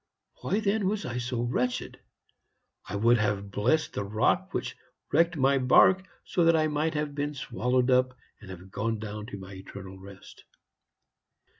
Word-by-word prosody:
Why, 205 - 0
then, 205 -1 +1
was 205 +1 -1
I 125 0 -3
so 120 -1 -2
wretched? 125 +1 -2 0.9
I - - -4
would 115 +3 +4
have 100 -1 -1
blessed 155 +11 +1
the - - -2
rock 105 +2 +1
which - - -3 0.4
wrecked 165 +2 +3
my 135 0 +3
bark 185 +9 +5 0.2
so 175 - +1
that 165 0 +5
I 155 -1 +3
might 155 +2 -1
have 150 -1 -2
been 145 +1 -3
swallowed 125 0 0
up 130 0 +2 0.2
and 105 - -13
have 95 0 -10
gone 115 +3 -1
down 105 0 -6
to 100 - -7
my 95 0 -10
eternal 95 0 -10
rest. 95 0 -13
125 Hz, 165 wpm, -28 LUFS, 105-150 Hz, 0.9 s, bark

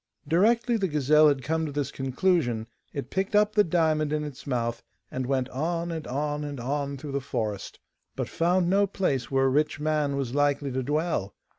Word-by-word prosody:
Directly 230 +8 +3
the 195 -3 0
gazelle 150 0 +4
had 140 -3 +2
come 160 +3 0
to - - -5
this 145 -1 -2
conclusion, 135 -4 0 0.3
it 140 -2 -6
picked 195 +2 -1
up 210 0 +4
the 210 - +5
diamond 155 -3 +1
in 150 0 0
its 145 -1 -8
mouth, 120 -3 -1 0.3
and 130 -1 -3
went 130 -2 0
on 170 +5 -2
and 160 -2 -5
on 145 +3 -2
and 145 -2 -5
on 140 +3 -2
through 145 +1 -7
the 140 0 -1
forest, 110 -7 -4 0.4
but - - -2
found 175 +1 +1
no 200 +2 +3
place 145 - -1
where 135 0 +2
a - - +4
rich 150 +3 +1
man 150 -2 0
was 135 -3 -2
likely 145 -1 +1
to 130 +1 -1
dwell. 145 - -1
145 Hz, 195 wpm, -27 LUFS, 135-165 Hz, 0.4 s, the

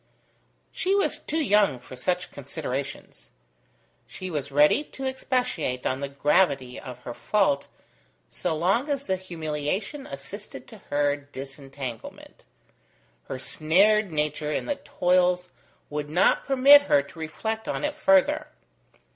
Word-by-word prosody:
She 385 +2 0
was 400 - +1
too 315 +1 -1
young 205 - +3
for 125 +1 -12
such 180 +7 -2
considerations. 135 - -6 0.8
She 185 -1 -7
was 140 -3 -3
ready 150 - +5
to 270 -2 -8
expatiate 250 - -1
on 130 - 0
the 140 0 -3
gravity 140 -3 +1
of 125 -1 -9
her 120 - -6
fault, 140 - +1 0.6
so 175 -3 -2
long 195 - +1
as 280 -1 -1
the 190 - 0
humiliation 180 - -4
assisted 140 +10 -9
to 220 -3 -12
her 145 0 +2
disentanglement: 135 -3 -9 0.8
her 130 - -5
snared 190 +9 +2
nature 150 0 -1
in - - -1
the 290 - -2
toils 180 0 +1 0.4
would 145 0 -3
not 175 +5 +3
permit 275 +1 +8
her 140 - +5
to 160 - -14
reflect 220 +8 -4
on - - -2
it 295 0 -1
further. 195 -1 +3
160 Hz, 130 wpm, -26 LUFS, 140-210 Hz, 0.8 s, permit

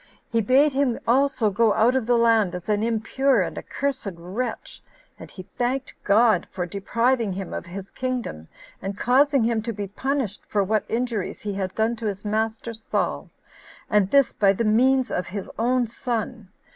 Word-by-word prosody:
He 230 -1 +2
bade 270 +7 +4
him 265 -3 +1
also 255 -3 +2
go 215 +1 +3
out 230 +4 +3
of 255 -4 0
the 245 -1 +4
land 225 -5 +3
as 180 - -7
an 210 -1 +1
impure 230 +1 +1
and - - -5
accursed 280 -5 -3
wretch; 200 +8 -5 0.4
and - - -10
he 185 - -10
thanked 250 +7 -3
God 220 +2 +4
for 180 -2 -3
depriving 230 +4 0
him 190 0 -6
of - - -5
his 190 +2 -8
kingdom, 250 - -4 0.3
and 195 +1 -5
causing 275 +2 +3
him 225 -1 +1
to 230 +2 -3
be 205 -2 -4
punished 230 +1 -3
for 205 -1 +1
what 215 +2 0
injuries 230 -4 -2
he 205 -1 -3
had 190 -1 -3
done 225 +2 +1
to 220 - -3
his 200 0 -4
master 220 +2 -2
[Saul], 220 0 -2 0.6
and 205 -3 +3
this 275 +2 +4
by 195 -2 +3
the 230 +4 -1
means 255 +4 +3
of 180 -1 -2
his 195 +2 -6
own 245 +2 +2
son. 230 -2 -4
225 Hz, 180 wpm, -24 LUFS, 200-250 Hz, 0.6 s, bade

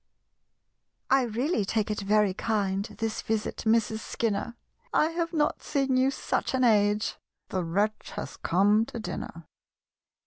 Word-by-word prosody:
"I 270 0 +6
really 240 - 0
take 215 +2 0
it 210 - -2
very 205 -1 +3
kind, 200 -2 -1
This 225 -1 -2
visit, 220 -1 -2
Mrs. 220 -1 +2
Skinner, 225 +1 -2 0.4
I 310 - +3
have 335 0 -2
not 300 -3 0
seen 275 -3 0
you 260 +1 +4
such 270 0 -1
an 255 - +2
age 210 -2 +3 0.3
(The 185 -1 -1
wretch 205 +6 -1
has - - -5
come 205 +5 +3
to 235 - -6
dinner!) 170 -6 -6
220 Hz, 140 wpm, -28 LUFS, 205-255 Hz, 0.4 s, I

